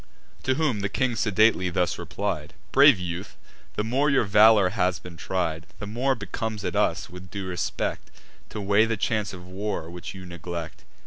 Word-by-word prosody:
To 130 - +2
whom 150 -9 +1
the 100 0 -1
king 130 +2 0
sedately 110 -3 +3
thus 90 0 0
replied: - - -4 0.2
"Brave 140 -3 +7
youth, 90 +2 -6 0.4
the 105 - 0
more 135 +7 +1
your 135 -3 +4
valour 105 -1 +6
has 90 -1 0
been 90 +1 -11
tried, 80 -2 -2
The 105 - -6
more 125 +6 0
becomes 110 0 -4
it - - -2
us, - - +1
with 90 0 -11
due 100 +2 -5
respect, 90 -2 -3 0.4
To - - -6
weigh 100 +2 +4
the 115 -1 -1
chance 105 -1 0
of 90 -2 -10
war, 95 -3 -4
which 90 +2 -7
you 95 -1 -9
neglect. 85 -1 -7
100 Hz, 180 wpm, -26 LUFS, 90-110 Hz, 0.4 s, Brave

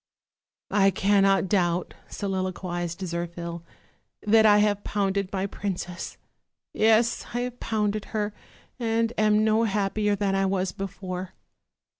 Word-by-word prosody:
"I 195 -1 +5
cannot 195 0 +3
doubt," 175 -3 +1 0.2
soliloquized 185 -3 -3
Zirphil, 170 -1 -4 0.6
"that 220 +1 +6
I 205 -1 +7
have 205 -1 +2
pounded 200 -1 -1
my 190 -1 -1
princess; 180 -3 -5 0.6
yes, 225 +2 +3
I 245 - +1
have 245 0 -5
pounded 215 -1 -1
her, 210 -1 -2 0.5
and 230 0 0
am 215 0 +3
no 220 +1 +3
happier 205 0 0
than 200 -1 0
I 195 0 +2
was 190 -1 0
before. 185 -2 -6
200 Hz, 120 wpm, -26 LUFS, 185-215 Hz, 0.6 s, I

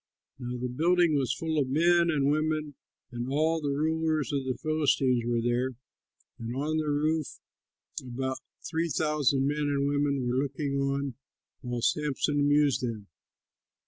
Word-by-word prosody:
Now 125 -1 -4
the 125 +1 -2
building 170 +6 +2
was 130 -4 +1
full 160 +1 -1
of 135 -3 0
men 170 +4 +4
and 145 -3 +2
women, 155 -1 0 0.4
and 120 +1 -4
all 160 +3 +1
the 145 - -1
rulers 155 -1 0
of 140 -2 -1
the 130 -1 -2
Philistines 140 -6 +1
were 120 -1 0
there, 120 +2 0 0.6
and 115 +1 -5
on 150 +4 -1
the 155 -1 -1
roof 155 +1 0 0.6
about 130 +1 -3 0.3
three 165 +1 -1
thousand 145 -2 +1
men 145 0 0
and 140 0 +1
women 140 -2 0
were 125 +1 0
looking 140 0 -3
on 140 -1 -1 0.5
while 120 -3 -4
Samson 145 +2 +1
amused 145 -1 +3
them. 110 -6 -4
145 Hz, 150 wpm, -28 LUFS, 130-155 Hz, 0.6 s, men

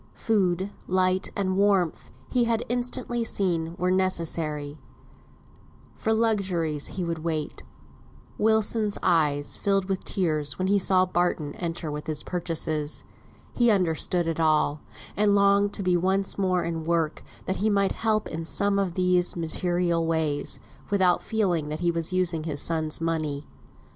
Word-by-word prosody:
Food, 190 -3 0 0.2
light, 185 0 +1
and 185 -2 0
warmth, 195 -4 +2 0.2
he 245 -2 +3
had 230 0 0
instantly 245 -1 -2
seen 170 -6 -1
were 180 0 +1
necessary; 160 -5 -1 1.2
for 220 - -1
luxuries 190 -9 0
he 185 - -1
would 165 -1 -3
wait. 155 -1 -3 0.8
Wilson's 220 -1 +2
eyes 150 -4 +2
filled 195 -1 +1
with 190 -1 -1
tears 155 -6 0
when 185 - -1
he 200 0 +4
saw 185 -1 +3
Barton 175 -5 -1
enter 165 -2 -4
with 150 0 -6
his 155 -1 -3
purchases. 160 -4 -1 0.5
He 240 -1 +3
understood 180 -3 +1
it 165 0 -2
all, 155 -2 +2 0.3
and 205 0 +3
longed 200 0 +4
to 200 - -2
be 180 -1 +2
once 190 +2 +1
more 185 -3 +1
in 165 -1 -3
work, 165 -1 0 0.2
that 190 - -1
he 215 +2 +1
might 200 -2 +2
help 215 -1 0
in 165 +1 -5
some 200 +6 +1
of 185 -3 -1
these 180 -1 +2
material 170 0 0
ways, 160 -3 -1 0.3
without 190 -3 +3
feeling 180 -9 0
that 155 +2 -4
he 175 -1 +2
was 165 +1 -3
using 175 -4 0
his 150 -3 -2
son's 160 -1 0
money. 155 -3 -2
180 Hz, 150 wpm, -26 LUFS, 160-200 Hz, 1.2 s, he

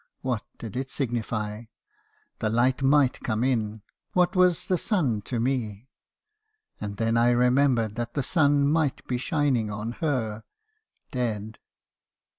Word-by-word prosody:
What 125 -5 -1 0.2
did 110 -4 -8
it 135 +1 -3
signify? 115 -4 -3 0.7
The 110 - 0
light 125 +4 +2
might 135 -1 +3
come 110 0 -1
in. 110 -5 -1 0.3
What 180 0 +2
was 180 -2 +3
the 185 - +1
sun 145 - 0
to 120 - -2
me? 120 -2 -2 0.9
And 100 -1 -5
then 115 +1 +1
I 120 +1 +4
remembered 125 -2 +3
that 120 0 -4
that 140 - 0
sun 145 -3 +3
might 150 -2 +1
be 125 -1 -1
shining 130 -6 +1
on 105 +2 -4
her, 115 -9 -1 0.3
— 435 0 -46
dead. 110 -4 -3
125 Hz, 140 wpm, -26 LUFS, 110-140 Hz, 0.9 s, I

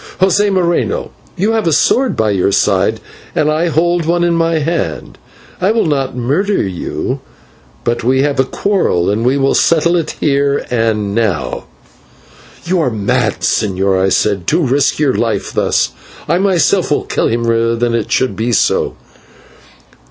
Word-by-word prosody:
José 200 +2 +3
Moreno, 185 - 0 0.3
you 200 +5 +1
have 225 -5 0
a - - +2
sword 255 - +2
by 110 -1 +1
your 100 0 +1
side 100 - +1 0.4
and 155 0 +2
I 160 +3 0
hold 170 +1 +1
one 175 +1 +1
in 175 0 +2
my 165 0 +1
hand; 150 - -3 0.4
I 185 - +2
will 225 +1 +1
not 135 -5 -1
murder 165 - 0
you, 90 -2 -4 0.6
but 120 0 -1
we 130 +3 +2
have 140 -2 -1
a - - +5
quarrel, 135 - 0
and 110 +3 -1
we 130 +3 +2
will 135 0 +2
settle 170 +1 +2
it 170 -3 -2
here 140 -1 +1
and 110 -4 0
now." 100 - -1 1.0
"You 180 +1 0
are 130 - +1
mad, 110 0 -1
señor," 95 -2 0
I 95 - +2
said, 100 -2 0
"to 165 +2 +2
risk 135 +2 +1
your 145 -4 +1
life 110 -4 -2
thus, - - +1 0.4
I 170 +4 +1
myself 190 -1 +2
will 150 - 0
kill - - 0
him 115 +1 -1
rather 115 0 +1
than 120 0 -1
it 115 -3 -2
should 130 - +1
be 115 +2 -1
so." 100 - +1
140 Hz, 165 wpm, -15 LUFS, 115-170 Hz, 1.0 s, a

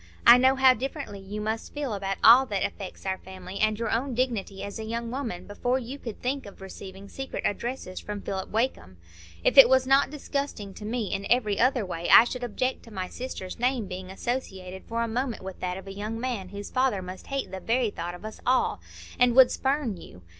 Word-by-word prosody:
I 240 +1 +10
know 260 +1 +5
how 265 -1 +6
differently 260 -4 -5
you 195 +2 -6
must 220 +5 -3
feel 285 -6 -2
about 195 -1 -2
all 255 +3 +8
that 200 -4 0
affects 195 -1 -7
our 190 -1 -1
family, 185 0 -9
and 215 -1 +2
your 230 - -2
own 250 +2 -1
dignity 225 -6 -1
as 200 +2 -6
a - - -4
young 230 +1 -4
woman, 230 -9 -4
before 245 +5 -1
you 260 +2 -6
could 230 -5 -7
think 265 -1 -2
of 200 - -13
receiving 195 0 -9
secret 270 +5 -6
addresses 205 -3 -3
from 210 -1 -5
Philip 190 -1 -4
Wakem. 220 - -2 0.5
If - - +6
it 250 -3 +11
was 260 0 +4
not 270 +1 +4
disgusting 280 -8 -4
to 210 - -9
me 220 -2 -2
in 200 0 -3
every 215 -4 +2
other 255 -2 +3
way, 175 -2 -4
I - - +10
should 245 +1 -5
object 255 +2 -1
to 230 - -13
my 185 -3 -4
sister's 245 -6 -6
name 250 -2 +1
being 185 0 -7
associated 190 -4 -4
for 230 0 -1
a - - -1
moment 240 -1 -2
with 190 -1 -7
that 180 0 -3
of 190 - -9
a 195 - -7
young 215 +3 -4
man 230 -7 -3
whose 200 +1 -7
father 255 -7 +1
must 185 +1 -9
hate 275 -1 -3
the 190 - -5
very 230 +2 +1
thought 175 -1 -5
of 180 - -11
us 215 - -7
all, 255 +1 +2 0.4
and 245 -1 +4
would 260 -1 +8
spurn 265 -7 0
you. 90 - -13
225 Hz, 220 wpm, -27 LUFS, 195-255 Hz, 0.5 s, it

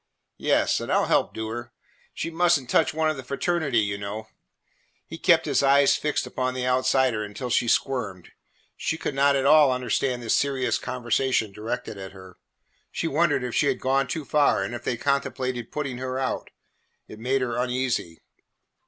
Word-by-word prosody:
"Yes, - - +2
and - - -5
I - - +4
'll - - +2
help - - +2
do 110 0 -5
her. 120 +2 -6 0.4
She 165 - -4
must 175 -1 +3
n't 130 - -13
touch 160 - +3
one 155 0 +1
of 155 - -6
the 130 - -7
fraternity, 140 0 -1
you 100 -1 -2
know." 105 +2 -6 0.8
He - - -9
kept - - +4
his - - +2
eyes 140 0 +5
fixed 150 -1 -1
upon 130 0 -2
the 125 -1 -2
outsider 130 -3 +2
until 115 +4 -6
she 120 - +2
squirmed. 115 -8 -1 0.4
She 160 - -2
could 150 - -3
not 140 +1 +3
at 135 -1 0
all 150 -1 +6
understand 125 0 -1
this 115 - +2
serious 135 -2 0
conversation 125 -2 0
directed 110 +1 -5
at 95 0 -8
her. 95 -2 -14 0.5
She - - -2
wondered 155 -3 +1
if 125 -2 -4
she 145 - +2
had 135 - 0
gone 135 0 +1
too 155 0 -4
far 150 -1 +2
and - - -4
if 120 - -6
they 120 - -1
contemplated 130 -3 -2
putting 140 -4 -4
her 130 0 -3
out. 130 -1 -2 0.6
It 110 - -11
made 130 +3 0
her 120 -2 -2
uneasy. 125 -9 -2
130 Hz, 190 wpm, -25 LUFS, 120-140 Hz, 0.8 s, all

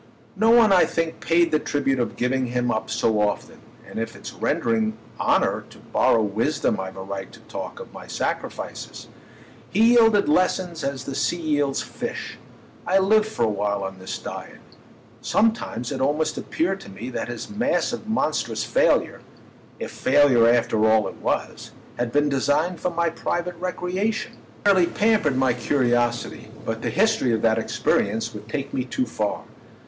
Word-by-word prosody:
No 220 +3 +3
one, 230 -3 +6
I 180 - +6
think, 165 -1 -2
paid 170 0 +2
the 155 - +3
tribute 135 -3 0
of 120 - -1
giving 130 +1 0
him 125 0 0
up 110 - -2
so 110 -1 +1
often, 105 0 -2 0.3
and - - -6
if 115 0 -4
it's - - -9
rendering 110 -1 0 0.2
honour - - +2
to - - -15
borrow 115 - +2
wisdom 110 +3 0
I've 95 0 -6
a 95 - -6
right 95 -1 -6
to - - -14
talk - - -7
of - - -10
my - - -10
sacrifices. - - -4 0.6
He 225 +4 +4
yielded 225 -4 +5
lessons 175 0 +1
as 140 -2 -3
the 135 - -5
sea 175 - 0
yields 145 -4 0
fish—I 190 - -5
lived 210 +3 +4
for 215 - -2
a - - +1
while 100 -1 -1
on 95 0 -6
this 95 - -5
diet. - - -8 0.6
Sometimes 215 - 0
it 130 -2 -3
almost 150 +3 +1
appeared 190 +4 -2
to - - -11
me 110 +6 -7
that - - -3
his 120 - -6
massive 240 0 -1
monstrous 155 - 0
failure—if 115 +1 -2
failure 130 -4 +4
after 110 -2 +3
all 110 -2 +3
it - - -12
was—had 120 -1 -4
been 145 +2 +2
designed 145 +5 +1
for 180 - 0
my 170 -1 0
private 175 +1 -3
recreation. 185 +4 -2
He - - -23
fairly 190 -4 +5
pampered 205 -12 +2
my 130 -2 +3
curiosity; 120 -1 0 0.2
but 115 0 -3
the - - -1
history 205 - +2
of 110 - -4
that 115 -1 +3
experience 110 0 0
would - - -10
take 140 -3 -4
me 130 - 0
too 130 0 -2
far. 105 -4 -2
135 Hz, 165 wpm, -23 LUFS, 115-180 Hz, 0.6 s, one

